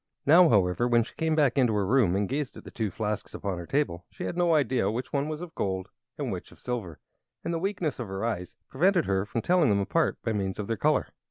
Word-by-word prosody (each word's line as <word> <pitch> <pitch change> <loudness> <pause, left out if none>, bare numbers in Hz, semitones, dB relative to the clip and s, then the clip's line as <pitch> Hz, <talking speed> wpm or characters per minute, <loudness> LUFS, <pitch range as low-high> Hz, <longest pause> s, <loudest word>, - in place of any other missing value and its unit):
Now, 165 +4 +7
however, 100 +2 +3
when 120 -1 +4
she - - -13
came 160 -1 0
back 145 -3 +3
into 120 -4 +3
her 100 -2 +1
room 105 -4 +3
and 100 0 +1
gazed 140 0 -3
at - - -11
the - - -11
two 110 -3 -2
flasks 105 +2 -3
upon 95 -3 -3
her 85 - -8
table, 135 -12 -1
she - - -8
had - - -3
no 175 -2 +3
idea 130 -6 +2
which 120 +4 -4
one 140 +1 0
was 155 +1 -4
of 175 -2 -8
gold 95 - -2 0.3
and - - -2
which - - -6
of - - -17
silver, 110 -11 -4 0.4
for - - -3
the 165 -1 -1
weakness 180 -6 -2
of 120 - -4
her 95 +3 -3
eyes 100 -6 -3
prevented 175 +4 +2
her 95 +1 0
from 115 +3 -3
telling 175 -5 +3
them 100 -1 +3
apart 135 +8 +1
by 115 - 0
means 95 -2 -2
of 105 - -3
their 115 - -1
color. - - +1
120 Hz, 255 wpm, -28 LUFS, 100-155 Hz, 0.4 s, Now